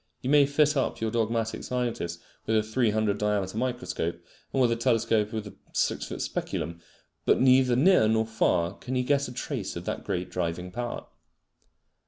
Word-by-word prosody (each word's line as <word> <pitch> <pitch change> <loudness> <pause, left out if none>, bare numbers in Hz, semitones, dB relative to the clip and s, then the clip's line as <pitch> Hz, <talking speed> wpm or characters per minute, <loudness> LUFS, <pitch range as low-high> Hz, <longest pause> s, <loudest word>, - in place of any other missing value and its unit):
You 130 - 0
may 145 -1 +6
fit 150 +1 +3
up 135 - 0
your 110 -1 -1
dogmatic 115 -1 -1
scientist 120 -9 -2 0.3
with 110 - +3
a 110 - +2
300 110 -2 +1
diameter 105 -2 0
microscope, 100 -9 -2 0.3
and 135 - 0
with 125 -2 +4
a - - +2
telescope 115 -3 +1
with 110 -1 -4
a 100 - -9 0.2
six - - 0
foot - - -4
speculum, 85 0 -4 0.4
but - - +3
neither 130 -1 +5
near 145 - +5
nor 110 0 +2
far 90 -5 +1
can 130 - -5
he 125 - +1
get 140 +1 +1
a - - -7
trace 120 -5 -4
of 85 +1 -6
that - - -3
great 90 0 -3
driving 90 0 -3
power. 120 +3 -4
110 Hz, 180 wpm, -27 LUFS, 100-125 Hz, 0.4 s, may